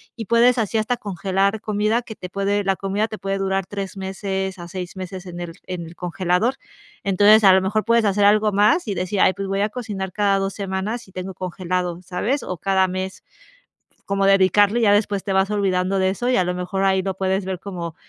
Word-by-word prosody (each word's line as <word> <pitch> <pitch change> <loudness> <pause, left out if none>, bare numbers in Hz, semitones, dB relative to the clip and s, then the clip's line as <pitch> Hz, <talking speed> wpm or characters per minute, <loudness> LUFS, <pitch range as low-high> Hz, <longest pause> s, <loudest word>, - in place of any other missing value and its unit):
y 225 - -6
puedes 235 +3 +4
así 225 0 0
hasta 225 +3 -1
congelar 195 +2 -1
comida 215 +2 0
que 225 -2 -10
te 180 - -8
puede, 200 +2 0
la 195 0 +1
comida 200 +3 -1
te 215 - -7
puede 195 0 -2
durar 195 -1 -1
3 195 -1 -6
meses 190 0 -3
a 175 - -8
6 180 +1 -6
meses 185 0 -7
en 175 -1 -7
el 170 -1 -6
en 180 -2 -5
el 165 +1 -12
congelador. 180 +7 0 0.5
Entonces, 205 +3 +5
a 190 - +8
lo 190 - +4
mejor 210 +3 0
puedes 230 -1 +3
hacer 200 0 +2
algo 210 +1 +4
más 210 - +3
y 200 - -2
decir: 185 +3 -2
"Ay, 185 - +5
pues, 195 0 -5
voy 195 +1 -1
a 210 - +1
cocinar 205 -6 -5
cada 200 0 +2
2 195 0 -2
semanas 200 +3 -4
y - - -17
tengo 185 +1 -6
congelado, 180 -1 -3
¿sabes?" 210 +10 -1
O 180 - -5
cada 190 +1 +2
mes, 185 +1 -5 0.8
cómo 195 0 0
dedicarle 195 +3 +4
y 230 - +1
ya 205 - +5
después 205 -1 +1
te 195 - -2
vas 190 +1 +2
olvidando 195 -2 +1
de 190 0 +2
eso 240 +6 -2
y 255 - +3
a 185 - +3
lo 180 0 -2
mejor 190 +2 -2
ahí 190 -1 +2
lo 195 0 -2
puedes 190 0 -1
ver 190 -2 -4
como, 175 -5 -6
195 Hz, 225 wpm, -22 LUFS, 185-205 Hz, 0.8 s, a